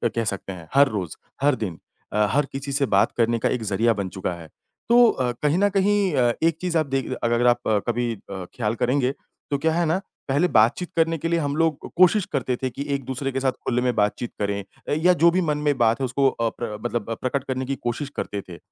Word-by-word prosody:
कह 115 Hz, -, +1 dB
सकते 95 Hz, 0 st, -6 dB
हैं, 85 Hz, -3 st, -11 dB
हर 140 Hz, +1 st, +6 dB
रोज़, 95 Hz, -8 st, -4 dB, 0.3 s
हर 145 Hz, -1 st, +4 dB
दिन 95 Hz, -9 st, -5 dB, 0.3 s
अ, 105 Hz, 0 st, +3 dB
हर 145 Hz, +2 st, +2 dB
किसी 140 Hz, +1 st, -5 dB
से 140 Hz, 0 st, +2 dB
बात 100 Hz, -, +4 dB
करने 115 Hz, 0 st, +2 dB
का -, -, +1 dB
एक 125 Hz, -3 st, -2 dB
ज़रिया 115 Hz, +4 st, +3 dB
बन 95 Hz, -2 st, -2 dB
चुका 90 Hz, -1 st, -2 dB
है, 80 Hz, -, -10 dB, 0.4 s
तो 240 Hz, +1 st, +7 dB
अ, 125 Hz, -2 st, 0 dB
कहीं 150 Hz, +3 st, +3 dB
न 205 Hz, +2 st, +3 dB
कहीं 200 Hz, -2 st, +2 dB
अ, 120 Hz, -3 st, +3 dB
एक 165 Hz, -1 st, +3 dB
चीज़ 180 Hz, -2 st, 0 dB
आप 155 Hz, -, +2 dB
देख 135 Hz, -, -2 dB
अगर 120 Hz, +1 st, +2 dB
आप 120 Hz, -, +2 dB
अ, 110 Hz, -, +3 dB
कभी 120 Hz, 0 st, 0 dB
अ, 95 Hz, -2 st, -8 dB
ख़्याल 110 Hz, -2 st, -1 dB
करेंगे 125 Hz, +2 st, +1 dB, 0.4 s
तो 140 Hz, -, +2 dB
क्या 160 Hz, +3 st, +1 dB
है 170 Hz, +1 st, +1 dB
ना, 165 Hz, +4 st, +1 dB, 0.3 s
पहले 145 Hz, +6 st, +2 dB
बातचीत 120 Hz, +6 st, +3 dB
करने 165 Hz, 0 st, +2 dB
के 165 Hz, -, -3 dB
लिए 170 Hz, 0 st, +1 dB
हम 145 Hz, -2 st, -1 dB
लोग 160 Hz, -3 st, 0 dB
कोशिश 185 Hz, +2 st, +5 dB
करते 130 Hz, -2 st, 0 dB
थे 130 Hz, -, -2 dB
कि 135 Hz, +3 st, -5 dB
एक-दूसरे 135 Hz, 0 st, -3 dB
के 135 Hz, -, -2 dB
साथ 135 Hz, 0 st, +1 dB
खुले 125 Hz, -1 st, +1 dB
में 125 Hz, 0 st, +1 dB
बातचीत 105 Hz, +3 st, 0 dB
करें 100 Hz, -1 st, -1 dB, 0.4 s
या 180 Hz, +1 st, +6 dB
जो 170 Hz, -1 st, +5 dB
भी 185 Hz, +2 st, +1 dB
मन 150 Hz, -4 st, 0 dB
में 145 Hz, -2 st, 0 dB
बात 115 Hz, -1 st, +3 dB
है -, -, +2 dB
उसको 135 Hz, +2 st, +2 dB
अ, 115 Hz, -3 st, -1 dB
प्र 110 Hz, -2 st, -6 dB
मतलब 120 Hz, -2 st, -2 dB
प्रकट 130 Hz, +1 st, -1 dB
करने 130 Hz, 0 st, -3 dB
की 135 Hz, +1 st, -2 dB
कोशिश 120 Hz, +4 st, -2 dB
करते 100 Hz, -, -3 dB
थे, 85 Hz, -, -8 dB
130 Hz, 240 wpm, -23 LUFS, 115-150 Hz, 0.4 s, तो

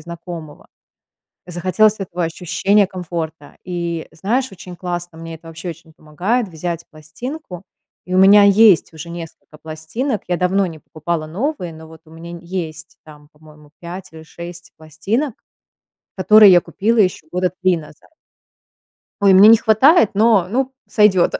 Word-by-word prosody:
знакомого, 170 Hz, -2 st, -10 dB, 0.8 s
захотелось 185 Hz, +5 st, +1 dB
этого 175 Hz, -2 st, -3 dB
ощущения 180 Hz, +5 st, +1 dB
комфорта. 165 Hz, -5 st, -7 dB
И 170 Hz, -2 st, -4 dB
знаешь, 245 Hz, +10 st, -2 dB
очень 180 Hz, -1 st, -11 dB
классно, 175 Hz, -2 st, -5 dB
мне 165 Hz, 0 st, -8 dB
это 165 Hz, -, -20 dB
вообще 165 Hz, +2 st, -8 dB
очень 165 Hz, 0 st, -13 dB
помогает 190 Hz, +11 st, -2 dB
взять 170 Hz, 0 st, -5 dB
пластинку. 180 Hz, -, -9 dB, 0.4 s
И 180 Hz, -, -7 dB
у -, -, +3 dB
меня 200 Hz, +2 st, +7 dB
есть 200 Hz, -4 st, +5 dB
уже 160 Hz, +2 st, -9 dB
несколько 165 Hz, -2 st, -10 dB
пластинок. 160 Hz, -, -4 dB
Я 175 Hz, -, 0 dB
давно 190 Hz, +2 st, +1 dB
не 160 Hz, -3 st, -8 dB
покупала 155 Hz, +1 st, -5 dB
новые, 190 Hz, -, -4 dB
но 160 Hz, 0 st, -13 dB
вот 160 Hz, 0 st, -15 dB
у -, -, -18 dB
меня 165 Hz, +1 st, -10 dB
н 170 Hz, -, -8 dB
есть 165 Hz, -3 st, -7 dB
там, 150 Hz, -1 st, -16 dB
по-моему, 150 Hz, -1 st, -19 dB
5 180 Hz, +1 st, -9 dB
или 160 Hz, -, -12 dB
6 175 Hz, +2 st, -11 dB
пластинок, 205 Hz, -, -3 dB, 0.8 s
которые 210 Hz, +1 st, +7 dB
я 175 Hz, -1 st, +6 dB
купила 225 Hz, +4 st, -1 dB
еще 185 Hz, -5 st, +1 dB
года 180 Hz, 0 st, -1 dB
3 185 Hz, -2 st, +3 dB
назад. 150 Hz, -1 st, -14 dB, 1.1 s
Ой, 200 Hz, -1 st, +5 dB
мне 195 Hz, +3 st, +8 dB
не 225 Hz, -, +9 dB
хватает, 230 Hz, -, +4 dB
но, 210 Hz, -4 st, +3 dB
ну, 265 Hz, +4 st, -2 dB
сойдет, 205 Hz, -5 st, +3 dB
175 Hz, 150 wpm, -18 LUFS, 160-200 Hz, 1.1 s, не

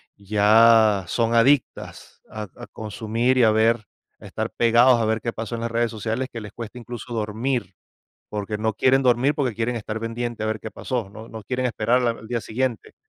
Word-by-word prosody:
ya 105 Hz, 0 st, +4 dB
son 115 Hz, +1 st, 0 dB
adictas 130 Hz, +3 st, +1 dB
a 110 Hz, 0 st, -6 dB
a -, -, -10 dB
consumir 110 Hz, +4 st, -1 dB
y 125 Hz, -, +5 dB
a 110 Hz, -, +5 dB
ver, 110 Hz, +1 st, +2 dB, 0.4 s
a -, -, -12 dB
estar -, -, -3 dB
pegados 120 Hz, +1 st, +4 dB
a -, -, +1 dB
ver 110 Hz, +1 st, 0 dB
qué 115 Hz, 0 st, -4 dB
pasó 115 Hz, +1 st, -5 dB
en 115 Hz, -, -5 dB
las 115 Hz, 0 st, -3 dB
redes 115 Hz, 0 st, 0 dB
sociales, 115 Hz, +4 st, -3 dB
que 115 Hz, -, -6 dB
les 105 Hz, -1 st, -10 dB
cuesta 115 Hz, +1 st, -8 dB
incluso 120 Hz, +1 st, -8 dB
dormir, 110 Hz, -1 st, -2 dB, 0.6 s
porque 105 Hz, 0 st, -4 dB
no 110 Hz, +1 st, 0 dB
quieren 135 Hz, +3 st, +3 dB
dormir, 125 Hz, +3 st, +3 dB
porque 130 Hz, -7 st, -1 dB
quieren 115 Hz, +2 st, -2 dB
estar 110 Hz, 0 st, -5 dB
pendiente 115 Hz, 0 st, -4 dB
a -, -, -1 dB
ver 110 Hz, 0 st, -1 dB
qué 110 Hz, -, -8 dB
pasó, 120 Hz, -6 st, -3 dB
no 110 Hz, +3 st, -11 dB
no 110 Hz, -1 st, -9 dB
quieren 125 Hz, +3 st, -1 dB
esperar 120 Hz, +2 st, +1 dB
al 115 Hz, -1 st, -3 dB
día 120 Hz, -1 st, -2 dB
siguiente. 120 Hz, +1 st, -3 dB
115 Hz, 200 wpm, -23 LUFS, 110-120 Hz, 0.6 s, y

